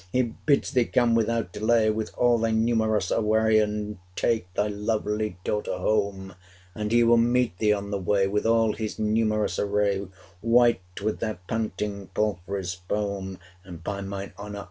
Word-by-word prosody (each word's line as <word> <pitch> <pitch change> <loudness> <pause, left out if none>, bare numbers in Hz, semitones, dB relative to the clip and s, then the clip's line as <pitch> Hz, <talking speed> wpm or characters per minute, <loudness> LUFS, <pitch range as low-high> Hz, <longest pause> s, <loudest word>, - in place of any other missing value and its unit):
He 130 +3 +2
bids 130 +5 0
thee 125 -4 +3
come 120 -1 +2
without 115 -4 0
delay 110 +1 +2
505 110 0 +2
With 110 -1 -3
all 120 -1 +3
thy 115 0 +1
numerous 110 -3 +1
array 110 0 +3
And 105 -1 -2 0.2
take 110 -6 0
thy 105 - +2
lovely 105 -1 -2
daughter 105 -3 -2
home: 100 -1 -1 0.4
And 105 +1 -3
he 120 0 +5
will 115 0 +5
meet 120 -2 +2
thee 105 -1 +3
on 100 -1 -1
the 100 - -1
way 95 +1 +2
With 105 +3 0
all 115 -1 +3
his 110 -2 -4
numerous 110 0 +1
array 100 -1 0 0.3
White 115 -6 +2
with 110 +1 -1
their 110 -4 -2
panting 105 -3 -3
palfreys' 95 -2 -2
foam: 100 -2 -2 0.3
510 - - -22
And, 85 -1 -9
by 100 +1 -3
mine 100 0 -6
honour! 105 0 -6
105 Hz, 170 wpm, -26 LUFS, 100-115 Hz, 0.4 s, he